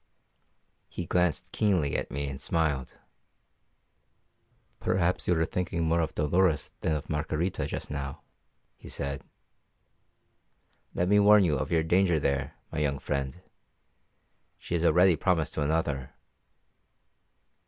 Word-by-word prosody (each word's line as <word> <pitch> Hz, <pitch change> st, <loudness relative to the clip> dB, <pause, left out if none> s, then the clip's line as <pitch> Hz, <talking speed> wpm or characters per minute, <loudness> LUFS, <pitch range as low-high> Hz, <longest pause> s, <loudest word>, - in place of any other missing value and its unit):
He 90 Hz, -, -5 dB
glanced 90 Hz, -2 st, 0 dB
keenly 90 Hz, -10 st, +1 dB
at -, -, -2 dB
me 70 Hz, +1 st, -3 dB
and 70 Hz, 0 st, -6 dB
smiled. 75 Hz, -6 st, -1 dB, 1.8 s
"Perhaps 90 Hz, -1 st, 0 dB
you 90 Hz, -, +3 dB
are 80 Hz, -, +2 dB
thinking 85 Hz, -2 st, -2 dB
more 80 Hz, +1 st, +2 dB
of 80 Hz, -2 st, -2 dB
Dolores 80 Hz, +2 st, +1 dB
than 80 Hz, -, 0 dB
of 75 Hz, -, -5 dB
Margarita 80 Hz, +4 st, -2 dB
just -, -, -5 dB
now," 70 Hz, -1 st, -5 dB, 0.5 s
he -, -, -12 dB
said. 70 Hz, -1 st, -4 dB, 1.7 s
"Let 90 Hz, -, +1 dB
me 105 Hz, +2 st, +5 dB
warn 105 Hz, 0 st, +7 dB
you 75 Hz, -4 st, +2 dB
of 65 Hz, -, -3 dB
your 80 Hz, -1 st, +3 dB
danger 90 Hz, +1 st, +3 dB
there, 70 Hz, -2 st, -1 dB, 0.2 s
my -, -, -3 dB
young 70 Hz, -2 st, 0 dB
friend. 70 Hz, +5 st, -4 dB, 1.1 s
She -, -, -7 dB
is 85 Hz, -1 st, +1 dB
already 90 Hz, +1 st, +5 dB
promised 80 Hz, -1 st, 0 dB
to -, -, -2 dB
another." 70 Hz, -3 st, -1 dB
80 Hz, 130 wpm, -28 LUFS, 70-90 Hz, 1.8 s, warn